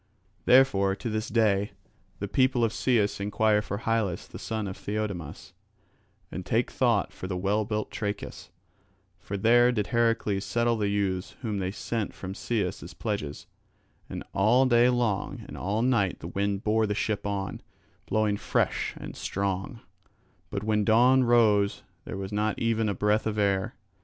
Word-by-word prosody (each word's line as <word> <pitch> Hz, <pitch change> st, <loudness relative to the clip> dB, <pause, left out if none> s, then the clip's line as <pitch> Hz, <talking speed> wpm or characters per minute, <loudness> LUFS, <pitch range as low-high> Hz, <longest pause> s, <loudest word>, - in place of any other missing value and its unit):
Therefore 100 Hz, -7 st, +5 dB
to 115 Hz, +2 st, -5 dB
this 110 Hz, 0 st, -2 dB
day 105 Hz, -3 st, +2 dB, 0.4 s
the -, -, -4 dB
people 130 Hz, -2 st, +2 dB
of 115 Hz, -, +2 dB
Cius 110 Hz, -7 st, +1 dB
enquire 105 Hz, +1 st, +2 dB
for 100 Hz, -1 st, -4 dB
Hylas 110 Hz, -5 st, -1 dB
the -, -, -10 dB
son 110 Hz, -1 st, -3 dB
of 95 Hz, -, -5 dB
Theiodamas, 100 Hz, -7 st, -5 dB, 0.8 s
and 90 Hz, -, -5 dB
take 115 Hz, +6 st, 0 dB
thought 115 Hz, -6 st, +1 dB
for 95 Hz, -, -7 dB
the 90 Hz, -1 st, -3 dB
well 100 Hz, +3 st, +1 dB
built 105 Hz, +1 st, -3 dB
Trachis. 105 Hz, -2 st, -5 dB, 0.7 s
For 100 Hz, -, -5 dB
there 120 Hz, +4 st, +5 dB
did 105 Hz, -4 st, -1 dB
Heracles 115 Hz, -4 st, +1 dB
settle 120 Hz, +1 st, +1 dB
the 105 Hz, -2 st, 0 dB
youths 95 Hz, -2 st, -1 dB
whom 105 Hz, -4 st, -2 dB
they 95 Hz, -1 st, -1 dB
sent 110 Hz, +2 st, -3 dB
from 95 Hz, 0 st, -6 dB
Cius 100 Hz, -3 st, -2 dB
as -, -, -10 dB
pledges. 75 Hz, -1 st, -4 dB, 0.6 s
And -, -, -5 dB
all 115 Hz, +7 st, +4 dB
day 120 Hz, -1 st, +5 dB
long 120 Hz, -5 st, -1 dB
and -, -, -9 dB
all 105 Hz, +5 st, -1 dB
night 115 Hz, -8 st, +2 dB
the -, -, -8 dB
wind 100 Hz, +1 st, -1 dB
bore 110 Hz, 0 st, +2 dB
the 105 Hz, -, -1 dB
ship 105 Hz, -1 st, -1 dB
on, 100 Hz, -1 st, -3 dB, 0.5 s
blowing 110 Hz, -1 st, +1 dB
fresh -, -, 0 dB
and -, -, -8 dB
strong; 100 Hz, +5 st, -3 dB, 0.7 s
but 100 Hz, -, -4 dB
when 105 Hz, -1 st, +1 dB
dawn 125 Hz, +5 st, +5 dB
rose 110 Hz, -4 st, +3 dB, 0.2 s
there -, -, -5 dB
was 95 Hz, 0 st, -5 dB
not 105 Hz, 0 st, 0 dB
even 115 Hz, -1 st, +1 dB
a 100 Hz, -, -1 dB
breath 105 Hz, +3 st, +1 dB
of 105 Hz, -1 st, -2 dB
air. 100 Hz, -2 st, +1 dB
105 Hz, 165 wpm, -27 LUFS, 100-115 Hz, 0.8 s, Therefore